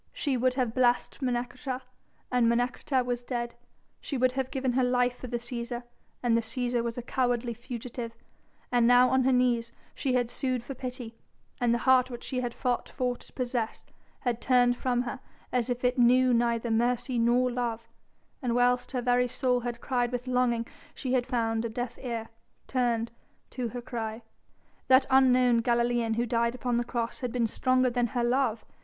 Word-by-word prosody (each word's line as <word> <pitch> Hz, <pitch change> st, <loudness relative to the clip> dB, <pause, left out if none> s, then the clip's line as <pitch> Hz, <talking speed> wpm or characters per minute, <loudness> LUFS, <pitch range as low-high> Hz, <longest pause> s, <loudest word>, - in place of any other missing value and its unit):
She 280 Hz, -3 st, -1 dB
would 255 Hz, +1 st, +1 dB
have 250 Hz, -4 st, 0 dB
blessed 245 Hz, +1 st, +1 dB
Menecreta 250 Hz, +1 st, -2 dB, 0.5 s
and 245 Hz, -2 st, +3 dB
Menecreta 245 Hz, +2 st, 0 dB
was 245 Hz, -1 st, -2 dB
dead; 240 Hz, -1 st, -3 dB, 0.5 s
she 280 Hz, -, -4 dB
would 255 Hz, 0 st, +3 dB
have 260 Hz, 0 st, -2 dB
given 265 Hz, -2 st, -1 dB
her 260 Hz, +1 st, +2 dB
life 250 Hz, 0 st, +1 dB
for 255 Hz, -, -6 dB
the 240 Hz, 0 st, -2 dB
Cæsar 240 Hz, 0 st, -4 dB, 0.4 s
and 240 Hz, -2 st, +3 dB
the 230 Hz, -, +3 dB
Cæsar 240 Hz, +1 st, -1 dB
was 235 Hz, 0 st, -3 dB
a 245 Hz, -, -4 dB
cowardly 245 Hz, -1 st, 0 dB
fugitive, 235 Hz, 0 st, -7 dB, 0.6 s
and 240 Hz, -1 st, +4 dB
now 245 Hz, +1 st, +6 dB
on 260 Hz, -1 st, +3 dB
her 265 Hz, -, +4 dB
knees 245 Hz, -2 st, +2 dB, 0.2 s
she 265 Hz, -, -1 dB
had 245 Hz, -1 st, +2 dB
sued 255 Hz, -3 st, -2 dB
for 275 Hz, -, -6 dB
pity, 250 Hz, -2 st, -6 dB, 0.5 s
and 245 Hz, -1 st, +2 dB
the 235 Hz, -, +3 dB
heart 260 Hz, -1 st, +5 dB
which 240 Hz, -1 st, -7 dB
she 255 Hz, -2 st, -2 dB
had 245 Hz, -1 st, -2 dB
fought 250 Hz, 0 st, -2 dB
for 250 Hz, -2 st, -1 dB
to -, -, -17 dB
possess 240 Hz, -3 st, -3 dB, 0.4 s
had 240 Hz, -2 st, -1 dB
turned 245 Hz, -1 st, +4 dB
from 245 Hz, -1 st, 0 dB
her 250 Hz, +1 st, -5 dB, 0.3 s
as 250 Hz, -1 st, 0 dB
if 245 Hz, 0 st, -2 dB
it 250 Hz, +1 st, +1 dB
knew 250 Hz, +1 st, +5 dB
neither 235 Hz, 0 st, +1 dB
mercy 240 Hz, +2 st, +1 dB
nor 245 Hz, +2 st, +3 dB
love, 235 Hz, -2 st, -3 dB, 0.5 s
and 245 Hz, -3 st, 0 dB
whilst 245 Hz, +1 st, +2 dB
her 250 Hz, -2 st, -1 dB
very 250 Hz, 0 st, +3 dB
soul 250 Hz, 0 st, +1 dB
had 240 Hz, -1 st, -5 dB
cried 245 Hz, -2 st, 0 dB
with 245 Hz, 0 st, -3 dB
longing 250 Hz, -2 st, +1 dB, 0.3 s
she 255 Hz, -1 st, -3 dB
had 250 Hz, -1 st, +1 dB
found 225 Hz, -3 st, 0 dB
a 230 Hz, -, -2 dB
deaf 245 Hz, +1 st, -5 dB
ear 230 Hz, -3 st, -4 dB, 0.4 s
turned 235 Hz, -3 st, 0 dB, 0.4 s
to 250 Hz, -2 st, -3 dB
her 240 Hz, +1 st, -6 dB
cry. 225 Hz, -2 st, -5 dB, 0.6 s
That 260 Hz, 0 st, +6 dB
unknown 255 Hz, -2 st, +5 dB
Galilean 235 Hz, -1 st, +1 dB
who 235 Hz, +1 st, +1 dB
died 235 Hz, 0 st, 0 dB
upon 245 Hz, -1 st, -1 dB
the 240 Hz, -, +1 dB
cross 235 Hz, -1 st, -3 dB
had 250 Hz, -3 st, -3 dB
been 245 Hz, -1 st, +1 dB
stronger 255 Hz, +2 st, +2 dB
than 240 Hz, 0 st, +1 dB
her 240 Hz, +2 st, -1 dB
love. 240 Hz, -2 st, +1 dB
245 Hz, 185 wpm, -28 LUFS, 235-255 Hz, 0.6 s, now